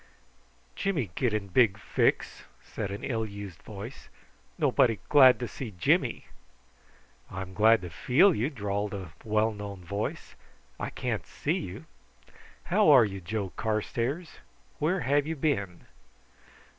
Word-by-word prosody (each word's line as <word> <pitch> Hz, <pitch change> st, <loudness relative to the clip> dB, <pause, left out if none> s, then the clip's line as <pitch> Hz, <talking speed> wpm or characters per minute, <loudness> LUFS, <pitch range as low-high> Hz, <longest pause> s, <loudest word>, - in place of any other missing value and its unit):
"Jimmy 150 Hz, -, -1 dB
get 125 Hz, +3 st, 0 dB
in 105 Hz, -2 st, -2 dB
big 100 Hz, 0 st, +4 dB
fix," 100 Hz, -, 0 dB, 0.2 s
said 100 Hz, -, -5 dB
an 100 Hz, +1 st, -6 dB
ill 115 Hz, -4 st, -1 dB
used 100 Hz, -5 st, -8 dB
voice. 105 Hz, +4 st, -9 dB, 0.5 s
"Nobody 115 Hz, -3 st, +3 dB
glad 130 Hz, -4 st, +7 dB
to 120 Hz, -, -3 dB
see 115 Hz, -7 st, -7 dB
Jimmy." -, -, +1 dB, 1.0 s
"I'm 95 Hz, 0 st, -6 dB
glad 110 Hz, +3 st, +5 dB
to 90 Hz, -, -7 dB
feel 160 Hz, -, +4 dB
you," 125 Hz, 0 st, 0 dB
drawled 105 Hz, -5 st, -3 dB
a 90 Hz, -6 st, -8 dB
well 110 Hz, +1 st, +1 dB
known 100 Hz, -3 st, -8 dB
voice. 100 Hz, +5 st, -4 dB, 0.5 s
"I -, -, -3 dB
can't -, -, -3 dB
see -, -, -2 dB
you. -, -, -7 dB, 0.9 s
How 210 Hz, -4 st, +5 dB
are 130 Hz, -6 st, +8 dB
you, 100 Hz, -2 st, -6 dB
Joe 100 Hz, +1 st, -3 dB
Carstairs? 120 Hz, -, -2 dB, 0.4 s
Where 170 Hz, +5 st, +1 dB
have 145 Hz, +1 st, +1 dB
you 160 Hz, -, -2 dB
been?" 100 Hz, -, -2 dB
110 Hz, 135 wpm, -28 LUFS, 100-135 Hz, 1.0 s, are